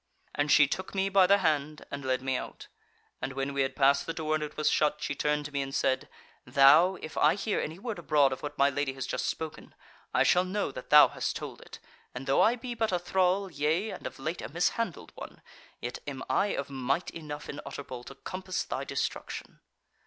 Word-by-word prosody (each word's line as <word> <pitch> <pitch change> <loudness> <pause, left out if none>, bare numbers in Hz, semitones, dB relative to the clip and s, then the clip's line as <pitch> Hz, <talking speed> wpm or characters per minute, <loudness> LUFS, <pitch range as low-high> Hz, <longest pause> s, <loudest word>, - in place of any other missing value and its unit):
"And 145 +1 0
she 145 - +7
took 185 +7 -4
me 195 0 +1
by 195 -1 +5
the 200 - +6
hand 155 -4 0
and 140 0 -5
led 130 0 0
me 130 -1 0
out, - - -6 0.5
and 135 +2 -3
when 135 +1 -2
we 140 - +1
had 135 0 -1
passed 140 0 +3
the 165 - -3
door 155 -1 -1
and 155 -1 0
it 150 - -7
was 155 - 0
shut, 150 0 +2
she 140 - -2
turned 150 +1 0
to 145 - -6
me 140 -1 -1
and 135 0 -4
said: 130 - 0 0.3
'Thou, 150 +7 +6
if 155 - -7
I 150 +3 +5
hear 205 +1 -1
any 160 +2 -4
word 215 -1 -5
abroad 145 -5 +3
of 130 - -7
what 145 0 -6
my 140 - +5
Lady 140 -1 -1
has 130 -1 -5
just - - -2
spoken, 155 -1 -5 0.4
I - - +3
shall 180 - +4
know 185 -2 -2
that 130 - -9
thou 150 0 +9
hast - - -3
told - - -7
it, - - -11 0.4
and 130 +2 -6
though 135 - +3
I 230 - +5
be 245 0 -6
but 225 -2 0
a 180 - +2
thrall, 185 +2 +1
yea, 160 +8 0
and - - -6
of - - -9
late 160 +6 -4
a - - -6
mishandled 175 +4 -1
one, - - -10 0.4
yet 120 - -5
am 135 -2 -5
I 130 +10 +2
of 140 -8 -3
might 135 +5 -1
enough 150 -2 -7
in 145 - -6
Utterbol 130 -3 -7
to 135 - -10
compass 185 +5 -4
thy - - -4
destruction.' - - -4
150 Hz, 225 wpm, -29 LUFS, 140-180 Hz, 0.5 s, thou